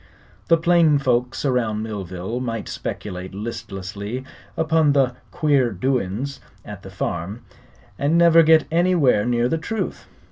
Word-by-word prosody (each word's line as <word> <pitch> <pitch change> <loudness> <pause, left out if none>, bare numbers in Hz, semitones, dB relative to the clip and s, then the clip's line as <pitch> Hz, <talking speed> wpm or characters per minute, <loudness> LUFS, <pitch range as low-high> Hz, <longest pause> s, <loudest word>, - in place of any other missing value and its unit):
The 165 - +5
plain 165 -3 +4
folks 125 0 0
around 115 -5 0
Millville 100 +1 -5
might 115 -3 -4
speculate 90 +1 -6
listlessly 100 +2 -6 0.3
upon 160 -2 +3
the 135 -3 +2 0.2
"queer 145 -7 +2
doin's" 125 +4 -2 0.3
at - - -9
the - - -10
farm, 85 +7 -4 0.6
and 150 +4 +2
never 170 -1 +7
get 160 -1 +5
anywhere 165 - +3
near 120 0 +2
the 165 +5 -1
truth. 220 +7 -4
125 Hz, 130 wpm, -22 LUFS, 105-160 Hz, 0.6 s, never